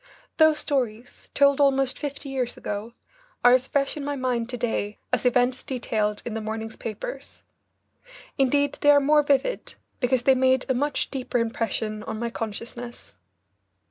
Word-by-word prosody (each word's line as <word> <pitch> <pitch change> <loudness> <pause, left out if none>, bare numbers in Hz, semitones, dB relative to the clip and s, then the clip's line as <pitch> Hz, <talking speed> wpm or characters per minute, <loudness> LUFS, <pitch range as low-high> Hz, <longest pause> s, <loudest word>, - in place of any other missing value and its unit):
Those 315 -1 +5
stories, 245 -5 -3
told 280 0 +4
almost 270 -2 +3
fifty 285 -1 -5
years 255 -3 -2
ago, 210 +3 -5 0.5
are 245 - +9
as 255 0 +3
fresh 275 -1 0
in 295 - -5
my 285 0 -2
mind 250 -3 -1
to 250 - -4
day 225 -3 -2 0.2
as - - +2
events 250 +1 +2
detailed 215 -5 -2
in 235 - -4
the 225 - -3
morning's 220 +1 -5
papers. - - -7 0.9
Indeed 285 +2 +1
they 290 - +4
are 290 0 +8
more 295 +2 +4
vivid, 285 - 0 0.2
because 250 -1 +1
they 265 - +6
made 260 0 +2
a 260 - +2
much 290 +4 -1
deeper 260 -2 -2
impression 225 -2 -2
on 220 +1 -5
my 235 +1 -3
consciousness. 230 +2 -7
255 Hz, 160 wpm, -25 LUFS, 230-280 Hz, 0.9 s, are